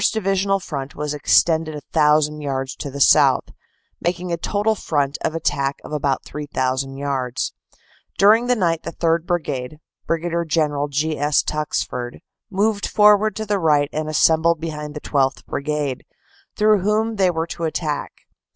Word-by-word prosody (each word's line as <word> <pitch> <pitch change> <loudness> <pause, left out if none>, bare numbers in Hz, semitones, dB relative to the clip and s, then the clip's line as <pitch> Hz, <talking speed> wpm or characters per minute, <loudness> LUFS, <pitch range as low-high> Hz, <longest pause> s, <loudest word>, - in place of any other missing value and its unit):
Divisional 195 -2 0
front 140 -7 -6
was 150 0 -3
extended 160 +2 +2
a 150 - -6
thousand 150 -1 +3
yards 135 -2 -3
to 140 - -5
the 140 +1 -7
south, - - +4 0.5
making 175 +1 -2
a - - +1
total 205 +5 0
front 145 -8 -1
of 160 - -1
attack 140 -3 -1
of - - -10
about 140 -2 0
3,000 135 -2 -3
yards. 135 -3 -2 0.6
During 220 +4 +5
the 250 - +3
night 170 -6 0
the - - -7
3rd. 165 0 0
Brigade, 150 -5 -3 0.3
Brig. 165 +1 -1 0.2
General 145 -2 +1
G. 150 +2 -1
S. 145 0 +2
Tuxford, 125 -5 -3 0.3
moved 205 +1 0
forward 210 0 +4
to 220 - -4
the 205 -1 0
right 150 -4 +2
and 155 0 -2
assembled 160 +2 +3
behind 150 -2 -6
the 150 - -6
12th. 135 -2 0
Brigade, 145 -2 -3 0.5
through 210 -1 +4
whom 215 +3 0
they 190 -2 +3
were 160 -2 -1
to 170 0 -5
attack. 155 -2 -3
155 Hz, 155 wpm, -21 LUFS, 145-180 Hz, 0.6 s, During